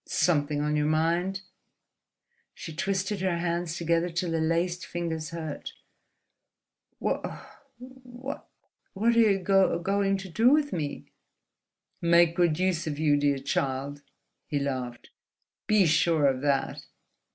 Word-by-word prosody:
"Something 145 -3 +1
on 150 0 0
your 150 0 +1
mind?" 170 +5 0 1.1
She 160 - -8
twisted 195 +2 -1
her 185 -2 0
hands 170 0 -2
together 170 +1 +1
till 170 0 -2
the 165 -1 0
laced 170 +2 0
fingers 165 -3 -4
hurt. 160 -3 -6 1.3
"Wha - - -3 0.4
what 255 +1 -9 0.5
are 225 +4 +3
you 225 -4 +4
go 195 0 +3
going 195 +2 +1
to 195 0 -8
do 220 +8 +3
with 290 +1 +2
me?" 150 -4 -4 0.9
"Make 170 0 +4
good 170 -4 +2
use 180 -2 0
of 145 -2 -3
you, 150 -1 +3
dear 145 -1 +2
child," 140 +1 -2 0.5
he 150 - -1
laughed: 130 -4 -4 0.6
"be 210 -3 +4
sure 160 -1 +3
of 130 -2 +2
that!" 140 -2 0
170 Hz, 130 wpm, -27 LUFS, 150-190 Hz, 1.3 s, you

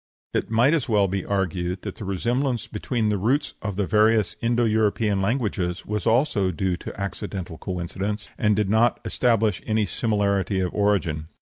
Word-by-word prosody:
It - - -1
might 120 +6 +4
as 155 -8 0
well 105 -3 +4
be 95 0 -2
argued 90 -2 -2
that - - -6
the 105 - -6
resemblance 120 +6 -1
between 110 +1 -1
the 105 -2 0
roots 130 +9 +1
of 100 -2 -3
the 100 0 0
various 110 +1 +3
Indo 120 0 +2
European 105 -2 +1
languages 100 -5 -1
was 105 -2 -2
also 115 -5 +2
due 90 +1 -1
to - - -8
accidental 100 -4 -5
coincidence, 95 +3 -4
and 105 -1 +2
did 105 -1 +1
not 110 +4 +3
establish 110 -5 +1
any 110 -1 +1
similarity 100 -2 0
of 90 -1 -1
origin. 95 -7 +1
105 Hz, 165 wpm, -24 LUFS, 95-115 Hz, -, might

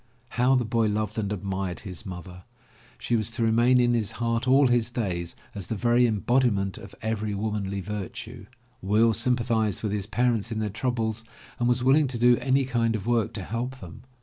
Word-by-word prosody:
How 125 +3 +2
the 125 -2 +1
boy 115 0 +1
loved 105 +1 -1
and 100 -2 -2
admired 95 -2 -3
his 95 -4 -8
mother. 90 0 -9 0.5
She 120 - -1
was 110 -1 +1
to 115 0 -2
remain 120 +3 +4
in 120 -1 +3
his 110 -4 0
heart 115 +1 -1
all 135 +2 +5
his 120 -2 +2
days 95 -8 -3 0.2
as 100 -3 -6
the 115 - -2
very 120 +3 +3
embodiment 110 -3 +1
of - - -12
every 110 -2 -2
womanly 100 -2 -2
virtue. 105 +3 -6 0.3
Will 110 +4 +3
sympathized 115 -4 0
with 105 - -1
his 100 -1 -2
parents 115 -1 0
in 110 - -3
their 110 -2 -2
troubles 110 0 -2 0.4
and 120 0 +2
was 125 0 +1
willing 140 +3 +4
to 125 -2 -4
do 120 +1 +5
any 135 0 +1
kind 115 -3 0
of 105 -2 -5
work 120 -3 +1
to 100 - -5
help 120 +6 -4
them. 90 -2 -11
115 Hz, 195 wpm, -26 LUFS, 105-120 Hz, 0.5 s, all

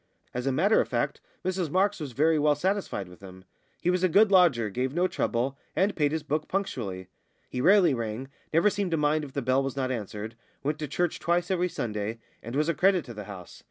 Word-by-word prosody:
As 125 +2 -3
a - - +3
matter 190 +11 +4
of - - -3
fact, - - -1 0.2
Mrs 185 -3 -1
Marks 195 +5 +1
was 145 -5 -6
very 155 +4 +3
well 150 0 +3
satisfied 185 - -1
with 90 0 -14
him. 95 -1 -12 0.4
He 180 - +2
was 180 0 0
a 185 - +4
good 205 +4 +5
lodger, 145 - +4
gave 130 +6 -2
no 180 +1 +3
trouble, 135 -2 -1 0.2
and 200 +2 +2
paid 145 -3 +2
his 160 -1 -2
book 155 +1 -2
punctually; 105 - -3 0.4
he 125 - -2
rarely 185 0 +5
rang, 115 +1 -3 0.2
never 170 +6 +4
seemed 200 -2 -1
to 165 - 0
mind 150 +1 +2
if 140 -2 -8
the 140 - -2
bell 130 +2 +2
was 135 -1 -3
not 130 -1 0
answered, 110 -1 -5 0.3
went 150 +2 -1
to 150 - -3
church 175 +4 -1
twice 175 +2 0
every 180 -1 +1
Sunday, 110 -5 -3 0.2
and 115 +3 -7
was 150 +2 +2
a 170 - +2
credit 185 0 +3
to 120 - -8
the 105 -2 -7
house. 95 -4 -10
150 Hz, 230 wpm, -27 LUFS, 120-180 Hz, 0.4 s, good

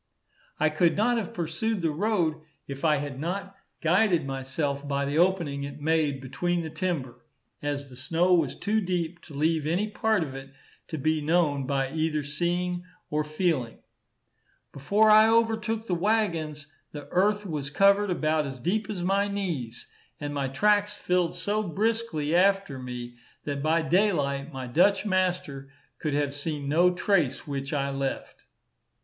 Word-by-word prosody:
I 155 - +4
could 165 +3 +2
not 240 +3 +3
have 210 -6 -3
pursued 175 +5 -2
the 165 - +2
road 170 -3 0 0.3
if 140 +2 -7
I 155 -2 +4
had 140 -2 -5
not 195 +5 -4 0.3
guided 175 -1 +3
myself 140 +1 -3
by 140 0 0
the 145 +3 0
opening 170 -6 +1
it 140 +1 -7
made 150 -3 +1
between 175 +6 -1
the 160 - -6
timber, 145 -8 -3 0.4
as 145 -1 -3
the 130 - -13
snow 165 +8 +1
was 160 -7 +2
too 215 +1 0
deep 175 -2 -2
to 150 - -11
leave 155 +1 +1
any 180 +7 +1
part 215 -3 +1
of 140 -4 -6
it 135 0 -10 0.3
to 160 - -5
be 155 +2 +1
known 150 -4 +1
by 135 -1 0
either 155 -1 0
seeing 175 +4 -1 0.3
or 150 0 +1
feeling. 150 -6 -1 0.9
Before 205 +11 +3
I 215 +1 +8
overtook 225 -1 +1
the 185 - -2
waggons, 170 -6 0 0.3
the 145 -1 -8
earth 205 +3 +2
was 150 -6 -4
covered 200 +5 +4
about 155 -3 +1
as 135 -1 -6
deep 195 - -1
as 190 -5 -3
my 195 +2 +2
knees; 170 - -4 0.3
and 145 -1 -4
my 140 -2 -1
tracks 205 +9 +2
filled 180 -1 0
so 205 +4 -1
briskly 200 -5 -1
after 195 -6 +2
me, 120 -1 -7 0.3
that 140 -1 -3
by 160 +2 +2
daylight, 155 -5 +1
my 130 -2 -5
Dutch 175 - +3
master 180 -8 -1 0.3
could 150 -2 -1
have 145 -1 0
seen 145 0 -4
no 170 +5 +4
trace 175 -7 +1
which 140 -1 -4
I 140 -1 -1
left. 135 -1 -4
160 Hz, 160 wpm, -27 LUFS, 140-190 Hz, 0.9 s, I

